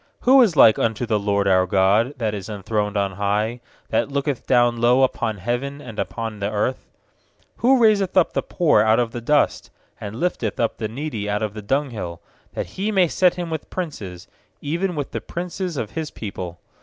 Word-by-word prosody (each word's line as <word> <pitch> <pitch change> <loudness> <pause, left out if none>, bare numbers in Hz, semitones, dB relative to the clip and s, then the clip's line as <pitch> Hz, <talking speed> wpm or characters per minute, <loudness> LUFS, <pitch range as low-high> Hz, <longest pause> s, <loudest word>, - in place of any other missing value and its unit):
5Who 260 +1 +7
is 195 -8 +1
like 115 -6 +7
unto 115 +2 0
the 110 -2 +1
LORD 100 -1 0
our 95 -1 +3
God, 100 +7 +2
That 110 -4 -1
is 100 0 -6
enthroned 105 0 -2
on 100 -1 0
high, 105 +5 -1 0.3
6That - - +1
looketh 140 -1 -2
down 120 -1 +3
low 125 +3 +4
Upon 110 -4 0
heaven 120 +8 -3
and 115 -7 -9
upon 115 -2 -4
the 100 0 -1
earth? 110 +5 -2 0.7
raiseth 220 -7 +4
up 180 - +4
the - - 0
poor 160 - +2
out 110 +2 +4
of 120 -2 0
the 120 - -6
dust, 145 +5 +1 0.3
And 105 +1 -6
lifteth 120 - -2
up 115 - 0
the 110 - -3
needy 115 -3 -4
out 105 +1 -1
of 105 -2 -2
the 105 - -7
dunghill; 105 - -2 0.4
8That - - -2
He 205 +3 -3
may 190 -4 +4
set 180 +2 +2
him 175 -2 -5
with 160 -2 -5
princes, 100 - -6 0.3
Even 170 +5 -2
with 145 -2 -4
the - - -4
princes 180 -1 -5
of 110 -4 -3
His 160 -2 -4
people. 90 -5 -7
120 Hz, 195 wpm, -22 LUFS, 105-155 Hz, 0.7 s, 5Who